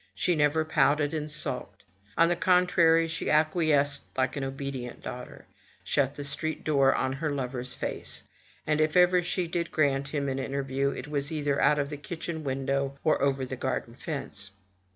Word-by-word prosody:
She 175 Hz, -, +1 dB
never 150 Hz, +1 st, +2 dB
pouted 150 Hz, -1 st, +2 dB
and 155 Hz, -1 st, -3 dB
sulked. 150 Hz, 0 st, -5 dB, 0.3 s
On 165 Hz, -, +6 dB
the 175 Hz, -, +2 dB
contrary 170 Hz, -2 st, +4 dB
she 165 Hz, +1 st, -3 dB
acquiesced 155 Hz, -2 st, +3 dB, 0.2 s
like 130 Hz, -, +1 dB
an 140 Hz, -, -3 dB
obedient 135 Hz, -2 st, -5 dB
daughter, 125 Hz, -, -8 dB, 0.4 s
shut 140 Hz, 0 st, +1 dB
the 145 Hz, -, -5 dB
street 160 Hz, +2 st, -2 dB
door 140 Hz, -3 st, +4 dB
in 130 Hz, 0 st, 0 dB
her 150 Hz, +3 st, -2 dB
lover's 130 Hz, -2 st, -3 dB
face, -, -, -3 dB, 0.4 s
and 155 Hz, 0 st, +1 dB
if 155 Hz, +3 st, +2 dB
ever 180 Hz, 0 st, +5 dB
she 175 Hz, +1 st, -1 dB
did 170 Hz, 0 st, -2 dB
grant 140 Hz, -2 st, +1 dB
him 140 Hz, -1 st, -2 dB
an 135 Hz, 0 st, -1 dB
interview, 135 Hz, 0 st, -1 dB
it 140 Hz, -, -6 dB
was 145 Hz, -1 st, -1 dB
either 145 Hz, -3 st, 0 dB
out 150 Hz, -, +4 dB
of 140 Hz, 0 st, -1 dB
the 145 Hz, -, -4 dB
kitchen 160 Hz, +1 st, -5 dB
window, 135 Hz, 0 st, -1 dB
or 155 Hz, -, +2 dB
over 135 Hz, -1 st, +1 dB
the 130 Hz, -, -5 dB
garden 130 Hz, -2 st, -3 dB
fence. 130 Hz, -, -5 dB
145 Hz, 175 wpm, -28 LUFS, 135-160 Hz, 0.4 s, On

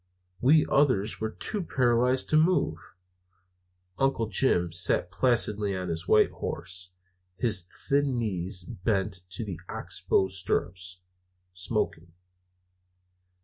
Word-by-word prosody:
We 150 Hz, +5 st, +5 dB
others 120 Hz, -9 st, +1 dB
were 110 Hz, -, -1 dB
too 205 Hz, -, -2 dB
paralyzed 125 Hz, -4 st, +2 dB
to -, -, +3 dB
move. 155 Hz, -, +2 dB, 1.2 s
Uncle 135 Hz, -4 st, +1 dB
Jim 95 Hz, -5 st, +1 dB
sat 90 Hz, +1 st, +1 dB
placidly 105 Hz, -4 st, +2 dB
on 90 Hz, -1 st, -4 dB
his 85 Hz, +2 st, -4 dB
white 105 Hz, -, +4 dB
horse, 90 Hz, 0 st, -4 dB, 0.4 s
his 95 Hz, -7 st, 0 dB, 0.2 s
thin 140 Hz, -2 st, +1 dB
knees 95 Hz, -4 st, -2 dB
bent 95 Hz, +1 st, -2 dB
to 95 Hz, +4 st, -4 dB
the 90 Hz, -6 st, -6 dB
ox -, -, -4 dB
bow 95 Hz, -, +2 dB
stirrups, 90 Hz, -1 st, -2 dB, 0.5 s
smoking. 85 Hz, -2 st, -3 dB
100 Hz, 110 wpm, -27 LUFS, 90-125 Hz, 1.2 s, We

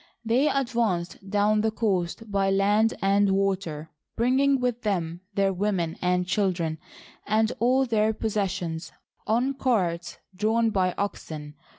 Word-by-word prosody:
They 250 Hz, +7 st, +3 dB
advanced 225 Hz, -8 st, -1 dB
down 210 Hz, +1 st, +2 dB
the 220 Hz, -, +2 dB
coast 210 Hz, -1 st, -2 dB
by 195 Hz, -1 st, +2 dB
land 205 Hz, +3 st, +3 dB
and 200 Hz, +1 st, +3 dB
water, 190 Hz, -5 st, -1 dB, 0.2 s
bringing 265 Hz, +3 st, +3 dB
with 245 Hz, -1 st, -1 dB
them 175 Hz, -5 st, -2 dB
their 195 Hz, -1 st, +2 dB
women 180 Hz, -4 st, -1 dB
and 180 Hz, 0 st, +1 dB
children 175 Hz, -5 st, 0 dB, 0.5 s
and 220 Hz, +2 st, +2 dB
all 255 Hz, +3 st, +3 dB
their 220 Hz, -3 st, +2 dB
possessions 190 Hz, -6 st, -3 dB, 0.4 s
on 245 Hz, +5 st, +1 dB
carts 180 Hz, -10 st, -1 dB, 0.2 s
drawn 220 Hz, +3 st, +1 dB
by 185 Hz, -3 st, +1 dB
oxen. 155 Hz, -7 st, -5 dB
200 Hz, 125 wpm, -26 LUFS, 180-225 Hz, 0.5 s, They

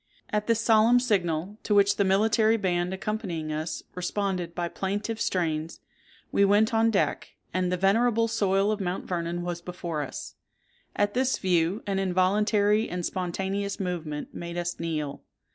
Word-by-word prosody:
At 210 Hz, 0 st, -1 dB
this 230 Hz, -1 st, +2 dB
solemn 225 Hz, +2 st, +5 dB
signal, 195 Hz, -4 st, -1 dB
to 210 Hz, -, 0 dB
which 200 Hz, 0 st, +4 dB
the 200 Hz, -, +3 dB
military 220 Hz, +3 st, +3 dB
band 180 Hz, -3 st, 0 dB
accompanying 190 Hz, -6 st, -3 dB
us 155 Hz, +2 st, -4 dB
responded 180 Hz, -1 st, -2 dB
by 175 Hz, -1 st, -1 dB
plaintive 205 Hz, +5 st, -3 dB
strains, 160 Hz, -3 st, -1 dB, 0.5 s
we 200 Hz, -, +3 dB
went 205 Hz, +3 st, +4 dB
on 225 Hz, 0 st, +4 dB
deck, 205 Hz, -3 st, -1 dB, 0.2 s
and 180 Hz, -1 st, 0 dB
the 180 Hz, -, +1 dB
venerable 230 Hz, +4 st, +3 dB
soil 200 Hz, -2 st, +2 dB
of 215 Hz, -1 st, -2 dB
Mount 180 Hz, 0 st, -3 dB
Vernon 175 Hz, -1 st, -2 dB
was 175 Hz, -1 st, -4 dB
before 170 Hz, -3 st, -4 dB
us. 140 Hz, -, -6 dB, 0.6 s
At 205 Hz, 0 st, +1 dB
this 260 Hz, +1 st, +1 dB
view, 180 Hz, +2 st, +1 dB
an 195 Hz, -1 st, -1 dB
involuntary 205 Hz, +3 st, +2 dB
and 180 Hz, -1 st, -3 dB
spontaneous 195 Hz, +2 st, -2 dB
movement 165 Hz, -6 st, -4 dB
made 170 Hz, 0 st, -6 dB
us 175 Hz, 0 st, -3 dB
kneel. 150 Hz, -4 st, -3 dB
190 Hz, 155 wpm, -27 LUFS, 175-210 Hz, 0.6 s, solemn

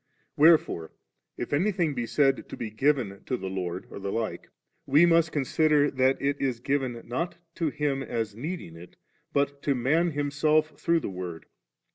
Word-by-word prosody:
Wherefore 150 Hz, -, +4 dB, 0.4 s
if -, -, -4 dB
anything 175 Hz, -1 st, +1 dB
be 120 Hz, -3 st, -3 dB
said 135 Hz, 0 st, +1 dB
to -, -, -7 dB
be 110 Hz, -2 st, -5 dB
given 115 Hz, -4 st, 0 dB
to 130 Hz, -, -1 dB
the 95 Hz, -3 st, -5 dB
Lord, 90 Hz, -1 st, -4 dB
or -, -, -7 dB
the 100 Hz, 0 st, -4 dB
like, 115 Hz, 0 st, -3 dB, 0.4 s
we 150 Hz, +5 st, +6 dB
must 165 Hz, -1 st, +4 dB
consider 150 Hz, +1 st, +2 dB
that 130 Hz, 0 st, +2 dB
it 140 Hz, +1 st, -1 dB
is 130 Hz, -4 st, 0 dB
given, 130 Hz, -3 st, -1 dB
not 170 Hz, +8 st, -3 dB, 0.2 s
to 165 Hz, -3 st, +1 dB
Him 140 Hz, -2 st, -1 dB
as 115 Hz, -5 st, -3 dB
needing 140 Hz, -, -6 dB
it, 85 Hz, +2 st, -13 dB, 0.4 s
but 140 Hz, 0 st, 0 dB
to 140 Hz, -, +1 dB
man 150 Hz, +8 st, +2 dB
himself 150 Hz, +1 st, +1 dB
through 170 Hz, -1 st, +2 dB
the -, -, -4 dB
Word. 90 Hz, -3 st, -6 dB
140 Hz, 170 wpm, -27 LUFS, 115-155 Hz, 0.4 s, we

